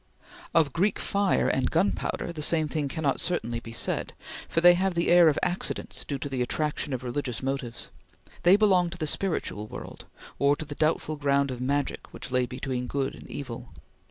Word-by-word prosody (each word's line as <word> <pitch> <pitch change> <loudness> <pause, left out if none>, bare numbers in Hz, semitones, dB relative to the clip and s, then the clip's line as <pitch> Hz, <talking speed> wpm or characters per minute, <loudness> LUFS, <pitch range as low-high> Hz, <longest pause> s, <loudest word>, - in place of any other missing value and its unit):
Of 155 -5 +4
Greek 195 +5 +2
fire 200 -1 +1
and 130 -1 +1
gunpowder, 170 0 0
the 155 - -6
same 155 0 +2
thing 150 -1 -1
cannot 140 -1 0
certainly 120 -10 -1
be 115 - -10
said, 115 - -2 0.4
for - - +1
they 175 +1 +8
have 185 +1 0
the 170 - +1
air 175 -2 +8
of 150 - 0
accidents 180 +1 -2
due 140 - -3
to 140 - -4
the 130 -3 -2
attraction 150 +3 -1
of 130 -1 -3
religious 125 0 -3
motives. 135 -3 -3 0.5
They 180 +2 +7
belong 190 -4 +4
to 170 - -8
the 160 - -2
spiritual 150 - -2
world; - - -9 0.3
or 140 +1 +4
to 155 - -6
the 145 - -6
doubtful 155 0 0
ground 140 -1 +2
of 125 -1 -5
Magic 140 +2 -1
which 125 - -6
lay 125 -1 +2
between 125 0 -3
Good 135 0 -1
and - - -12
Evil. 120 -3 -6
145 Hz, 190 wpm, -27 LUFS, 130-170 Hz, 0.5 s, they